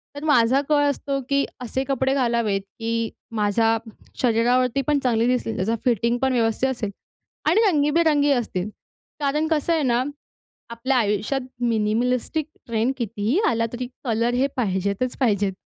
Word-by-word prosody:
तर 285 - -7
माझा 265 -2 +4
कल 295 -1 +4
असतो, 275 0 -2
की 280 0 +2 0.2
असे 260 +2 -2
कपडे 265 0 0
घालावेत, 235 -6 +1
की 230 +3 -3 0.3
माझ्या 225 +2 +2 0.4
शरीरावरती 250 +2 +2
पण 295 -1 +3
चांगले 230 -3 +2
दिसतील, 250 -2 0
त्याचा 215 +5 0
फिटिंगपण 240 +3 +1
व्यवस्थित 235 +2 +1
असेल 230 -5 -3 0.6
आणि 415 +7 +4
रंगीबेरंगी 295 -2 +3
असतील. 210 -6 -1 0.5
कारण 300 +2 0
कसं 320 +2 +1
आहे 315 -3 +1
ना, 245 -1 +2 0.7
आपल्या 250 +3 -1
आयुष्यात 210 +4 0 0.2
मिनिमिलिस्टिक 240 +6 0 0.2
ट्रेंड 230 +3 0
कितीही 225 - -1
आला, 230 -1 +1
तरी 245 0 -4 0.2
कलर 235 -1 0
हे 260 +3 +2
पाहिजेतच 200 +2 -1
पाहिजेत. 205 -6 +1
245 Hz, 140 wpm, -23 LUFS, 225-275 Hz, 0.7 s, माझा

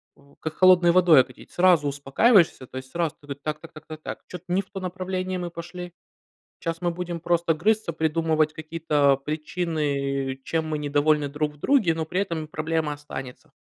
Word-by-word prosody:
в 140 0 -23
как 160 - -4
холодной 180 -2 +6
водой 170 -5 +7
окатить. 130 0 -10
Сразу 175 -5 +4
успокаиваешься, 145 - +3
то 130 - -9
есть 130 0 -8
сразу 170 -3 -1
ты: 145 -1 -6
так 150 +2 -4
так 165 +1 -13
так 155 0 -13
так 155 -1 -9
так, - - -5
чё-то 180 0 -9
не 190 - +3
в 195 - -20
то 195 - -6
направление 185 0 -3
мы 175 -1 -4
пошли. 175 +1 -8 0.7
Щас 165 +1 -3
мы 175 -1 +1
будем 175 0 -5
просто 170 0 +1
грызться, 210 +4 +1
придумывать 160 -1 +1
какие-то 155 -3 +1
причины, 145 -3 -2
чем 160 -1 -1
мы 155 -1 -2
недовольны 145 0 +2
друг 150 +1 -2
в - - -19
друге, 215 - +3
но 160 0 -3
при 180 +4 -1
этом 165 -5 -3
проблема 155 0 -1
останется. 135 -3 -9
160 Hz, 185 wpm, -25 LUFS, 150-175 Hz, 0.7 s, водой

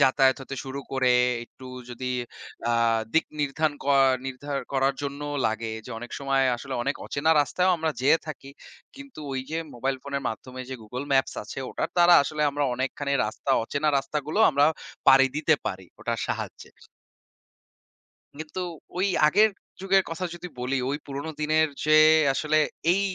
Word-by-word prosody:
যাতায়াত 130 -1 +4
হতে 135 - -7
শুরু 135 +1 -5
করে 130 -1 +3 0.3
একটু 130 +2 -14 0.2
যদি 125 +1 -4 0.6
আ - - +2 0.4
দিক 160 - +4 0.2
নির্ধারন 145 +2 0
করা 140 -1 +4 0.2
নির্ধারন 140 +2 -4
করার 135 0 +2
জন্যও 145 +1 -4
লাগে 110 +1 -2 0.2
যে - - -9
অনেক 120 +1 -9
সময় 135 -1 +1
আসলে 135 +2 -6
অনেক 140 +3 -1
অচেনা 150 +3 +1
রাস্তায় 180 +6 +1
আমরা 160 -1 -1
যেয়ে 140 +5 +4
থাকি। 140 -3 -8 0.5
কিন্তু 275 - -11
ওই 130 - -1
যে 160 - -1 0.2
মোবাইল 130 +3 -1
ফোনের 140 -1 -4
মাধ্যমে 130 +3 -7
যে 130 - -5
Google 125 +6 -6
maps 135 -1 +2
আছে 105 - -8
ওটার - - -3
দ্বারা 175 0 +7
আসলে 150 +2 -2
আমরা 145 +1 -1
অনেকখানি 135 +2 -2
রাস্তা, 110 - -4
অচেনা 145 +5 -1
রাস্তাগুলো 150 +5 -3
আমরা 140 -1 +3 0.4
পাড়ি 135 0 +8
দিতে 155 +1 +3
পারি, 95 0 -4
ওটার - - -2
সাহায্যে। - - -5 1.7
কিন্তু 155 +4 -6 0.4
ওই 190 - +2 0.2
আগের 210 +8 +5 0.3
যুগের 195 0 +3
কথা 165 +3 -4
যদি 180 +1 -8
বলি, 130 +2 -1
ওই 145 - -1
পুরনো 140 +3 -5
দিনের 155 +1 +3 0.2
যে 155 - +2 0.4
আসলে 155 +2 +1 0.3
এই 190 - +2
140 Hz, 160 wpm, -26 LUFS, 130-155 Hz, 1.7 s, পাড়ি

